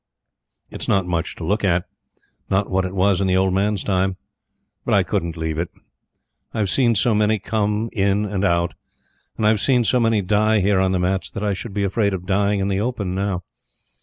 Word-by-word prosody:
It's - - -6
not 95 -2 +2
much 85 -1 -2
to - - -8
look 105 +7 0
at. 85 -2 +2 0.6
Not 100 +1 0
what 95 0 +1
it 95 +1 -5
was 95 0 +2
in 95 - +1
the 95 0 +2
old 95 0 +2
man's 100 +2 0
time, 95 -1 0 0.7
but - - +1
I - - +4
couldn't 85 0 -2
leave 80 -1 -2
it. 85 - -2 0.9
I've 105 -4 0
seen 120 -4 +3
so 115 +2 +2
many 105 +1 +2
come 105 +1 -1
in 100 0 +1
and 100 -1 -2
out. 85 -3 +1 0.6
And 110 - 0
I've 105 -1 +3
seen 125 -1 +3
so 125 +2 +2
many 115 -3 +2
die 105 +3 +2
here 100 0 +2
on 95 0 +2
the 95 - +1
mats 95 +2 -1
that 100 - -6
I 105 -1 +1
should 100 +2 -7
be 100 - 0
afraid 100 0 +1
of 90 -1 -7
dying 100 +1 +1
in 95 - 0
the 100 0 0
open 105 -6 -2
now. 95 -2 -2
100 Hz, 210 wpm, -21 LUFS, 95-105 Hz, 0.9 s, I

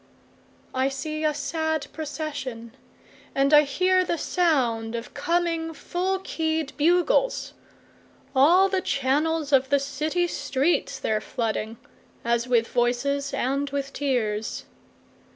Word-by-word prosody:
3I 260 +1 +1
see 310 +3 -4
a 305 - +3
sad 315 0 -2
procession, 285 -6 -5 0.6
And 275 +2 +3
I 295 - +9
hear 365 +6 +2
the 340 -1 -1
sound 245 -11 +1
of 235 +1 -6
coming 335 -2 -1
full 370 +5 -1
key'd 320 -5 -2
bugles; 360 +11 +2 0.8
All 340 +9 +6
the 380 -1 0
channels 295 +2 0
of 265 -1 +4
the 285 - +4
city 305 +5 -1
streets 300 -1 0
they're 215 -1 -1
flooding, 225 -2 -3 0.5
As 235 +1 +1
with 235 -2 +2
voices 275 +4 0
and 275 +3 -1
with 275 0 -4
tears. 225 -7 -1
285 Hz, 115 wpm, -25 LUFS, 260-325 Hz, 0.8 s, I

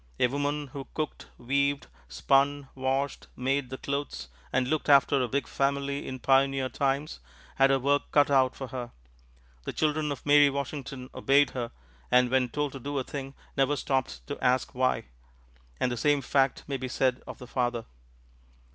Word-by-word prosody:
A - - +5
woman 145 +3 -1
who 135 +1 -7
cooked, 155 -1 -4
weaved, 140 +3 0 0.2
spun, 135 - +1
washed, 135 +1 -2
made 130 +1 -1
the 130 - -5
clothes, 140 - -4 0.2
and 125 0 +1
looked 155 +2 -1
after 140 -1 +5
a 125 - 0
big 140 +4 -1
family 140 0 -1
in 130 - -4
pioneer 135 0 +2
times 140 +4 -1 0.4
had 135 0 +5
her 135 - +4
work 140 +2 0
cut 145 -1 +4
out 130 -2 +4
for 135 -2 -6
her. 125 -2 -5 0.8
The - - -4
children 155 -1 0
of 140 - -6
Mary 145 0 +6
Washington 140 -2 -5
obeyed 140 0 +3
her, 120 -2 -3 0.4
and 125 0 +4
when 130 -1 +2
told 145 +2 -2
to 135 - -8
do 145 +3 -4
a 135 - 0
thing 135 0 -7 0.2
never 135 +2 +2
stopped 130 - -2
to - - -6
ask 130 +2 +2
why 130 0 +1 0.8
and 125 - +1
the 120 - -3
same 145 +3 +2
fact 135 0 +1
may 140 - -3
be 130 0 -4
said 130 0 0
of - - -7
the 125 - -10
father. 120 -2 -1
135 Hz, 175 wpm, -28 LUFS, 130-140 Hz, 0.8 s, Mary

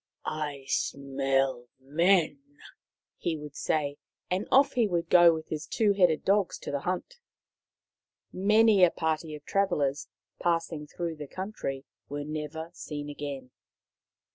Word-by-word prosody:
" - - -46 0.2
I 140 -2 -9
smell 135 -3 0
men," 170 - +2 0.8
he 165 -2 -2
would 150 -1 -9
say, 145 -2 -1 0.3
and 185 +3 0
off 275 +2 +5
he 235 -4 +3
would 170 -3 -1
go 175 -1 +8
with 160 -1 -5
his 155 -1 -4
two 210 -3 +2
headed 180 -5 +3
dogs 200 -1 +2
to - - -5
the 140 - -1
hunt. 185 - -4 1.1
Many 210 +1 +5
a 180 - +8
party 160 -1 -2
of 150 - -12
travellers, 150 -8 0 0.3
passing 165 -3 -1
through 165 +1 -4
the 150 -1 -7
country, 185 -8 -5 0.2
was 145 0 -4
never 155 +2 -5
seen 145 -3 -6
again. 140 -3 -6
160 Hz, 140 wpm, -28 LUFS, 145-185 Hz, 1.1 s, go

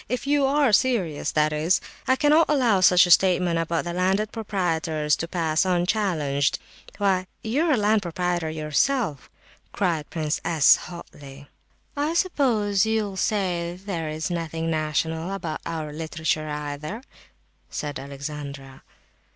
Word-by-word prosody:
If 250 +3 -2
you 285 -1 +2
are 280 -4 +2
serious, 200 - +1
that 155 0 +2
is. 155 +4 +2 0.3
I 260 - +4
cannot 300 +4 +4
allow 245 -10 +3
such 180 0 +6
a 175 - -1
statement 180 -2 +4
about 165 0 -1
the 175 - -4
landed 190 +4 0
proprietors 165 -8 -1
to 165 - -4
pass 165 -3 0
unchallenged. 175 -7 0 0.4
Why, 190 -3 +1 0.2
you 260 +9 0
are 315 - +3
a - - +2
landed 210 0 +2
proprietor 175 -2 -2
yourself!" 155 - -1 0.4
cried 165 -6 -1
Prince 155 -2 -2
S. 160 -4 +5
hotly. 145 -5 -11 0.5
"I 295 +3 -1
suppose 230 - +2
you'll 220 -3 -1
say 180 -4 -1
there 175 -5 -4
is 155 +3 -3
nothing 165 -1 -3
national 160 +2 -1
about 170 -5 -5
our 155 -2 -4
literature 160 -1 -2
either?" 150 - -5 0.7
said 145 -2 -4
Alexandra. 140 -1 -8
175 Hz, 135 wpm, -24 LUFS, 155-205 Hz, 0.7 s, such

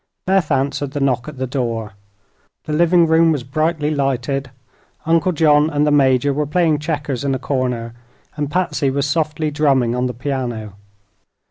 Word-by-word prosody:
Beth 190 -4 +2
answered 140 0 -1
the 145 - -2
knock 130 -2 0
at 150 -3 -8
the 130 - -2
door. 115 -5 -3 0.7
The 155 - -4
living 170 +2 +4
room 165 0 +4
was 145 -5 -1
brightly 155 +2 -1
lighted; 135 -1 -1 0.6
Uncle 165 +3 +2
John 150 -2 +3
and 150 -1 +1
the 150 - +2
Major 140 -1 +3
were 150 +1 -1
playing 160 -1 +2
checkers 150 -4 -3
in 135 -1 0
a - - -1
corner 125 -3 -2 0.4
and 145 -2 -3
Patsy 165 -4 0
was 140 +1 -1
softly 155 0 -1
drumming 135 -5 +2
on 125 +1 0
the 125 - -5
piano. 120 -5 -4
145 Hz, 165 wpm, -19 LUFS, 130-155 Hz, 0.7 s, living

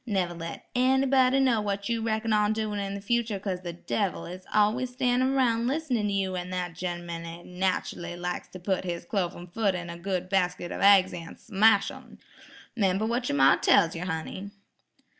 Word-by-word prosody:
Never 185 -5 0
let 165 0 -7
anybody 265 +1 +3
know 250 -5 +3
what 200 -1 -2
you 230 -1 -1
reckon 220 0 0
on 210 0 +3
doin' 215 -1 -2
in 200 0 -3
the 200 - -6
future 230 0 0
'cause 185 -2 -3
the 175 -1 -5
devil 190 +3 -2
is 180 +1 -9
always 220 +5 +2
standin' 255 +1 +1
'roun' 235 -3 +2
listenin' 260 -7 0
to - - -1
you, 190 -2 -1
an' 180 0 -4
that 180 -1 -3
gen'man 175 -1 -5
jes' 170 +1 -9
nachally 180 -1 -2
likes 180 0 -4
to 185 - -10
put 190 +1 -1
his 170 -2 -4
cloven 175 -3 -2
foot 195 +2 0
into 175 -1 -5
a - - -9
good 185 0 -2
basket 180 -2 0
of - - -5
aigs 195 -2 +6
an' 165 -1 -8
smash 220 +1 +3
'em. - - -13 0.6
'Member 195 -1 +1
what 240 +2 -1
yer - - 0
ma 135 -1 +6
tells 165 0 +4
yer, 170 +2 -4
honey." 180 +3 -4
195 Hz, 195 wpm, -27 LUFS, 180-225 Hz, 0.6 s, aigs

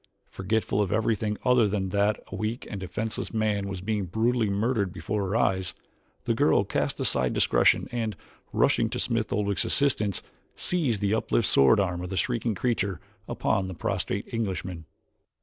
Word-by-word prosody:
Forgetful 105 +1 0
of 100 -1 -1
everything 110 -1 0
other 125 -3 +5
than 100 -2 -1
that 100 +2 +1
a - - -4
weak 110 +3 -3
and 100 - -5
defenseless 100 +5 -4
man 105 -2 0
was 95 -2 -5
being 105 0 -1
brutally 110 +4 +1
murdered 100 -1 0
before 100 +2 -3
her 100 - -1
eyes, 95 -5 +1 0.5
the - - +1
girl - - +3
cast - - -1
aside 65 -1 +1
discretion - - +3
and, 115 -3 -2 0.4
rushing - - +2
to - - -3
Smith 115 -2 -1
Oldwick's 100 -1 +1
assistance, 110 -9 +1 0.3
seized 140 - 0
the 100 0 +1
uplifted 110 0 +1
sword 70 +7 +5
arm 90 -3 0
of 90 - -5
the 95 - -3
shrieking 115 -2 0
creature 100 -5 -1 0.3
upon 95 -1 0
the 95 - -6
prostrate 100 +4 -2
Englishman. 95 -6 -3
105 Hz, 165 wpm, -27 LUFS, 95-110 Hz, 0.5 s, other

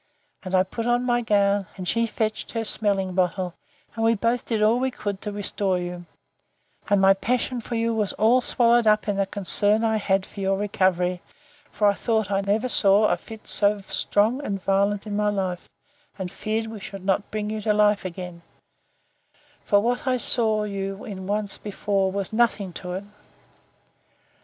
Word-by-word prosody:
And 190 0 -3
I 185 - +5
put 225 +5 -5
on 240 +1 +2
my 240 -1 +2
gown, 200 -3 +2
and 185 -1 -5
she 230 +3 +1
fetched 215 -1 -3
her 230 -1 -1
smelling 200 -4 +1
bottle, 180 -1 0 0.4
and 225 - -3
we 225 0 +4
both 230 +3 0
did 220 -3 0
all 225 +3 +4
we 260 +1 0
could 205 -5 -5
to 210 - -4
restore 200 -2 -1
you; 175 -1 -6 0.8
and 205 -1 +4
my 195 0 +6
passion 245 +4 -1
for 235 - -5
you 230 0 0
was 215 -3 0
all 235 +4 +3
swallowed 235 -1 +3
up 215 +1 +3
in 205 -1 0
the 195 -1 +1
concern 205 +3 +2
I 220 -1 +2
had 195 -2 0
for - - -12
your 195 0 0
recovery; 185 -3 0 0.5
for 210 - -1
I 200 - +4
thought 220 -1 -1
I 195 0 +1
never 210 +5 0
saw 210 -2 +4
a - - +2
fit 220 -2 -12
so 205 0 +2
strong 210 +5 0
and 200 -6 -3
violent 200 +2 +1
in 210 -1 -4
my 210 0 +1
life: 190 -3 -3 0.5
and 185 -2 -5
feared 220 +1 -2
we 220 -1 -8
should 195 -1 -9
not 195 +1 0
bring 215 0 -3
you 215 0 -3
to 215 - +1
life 210 -1 +3
again; 180 -1 -7 1.2
for 205 0 +3
what 245 +4 -1
I 255 -1 +2
saw 220 -3 +2
you 195 -1 -4
in 190 -3 -7
once 205 0 -1
before 200 -2 -1
was 200 +1 -4
nothing 215 -5 +1
to 180 0 -6
it. 190 +2 -4
205 Hz, 185 wpm, -24 LUFS, 195-220 Hz, 1.2 s, my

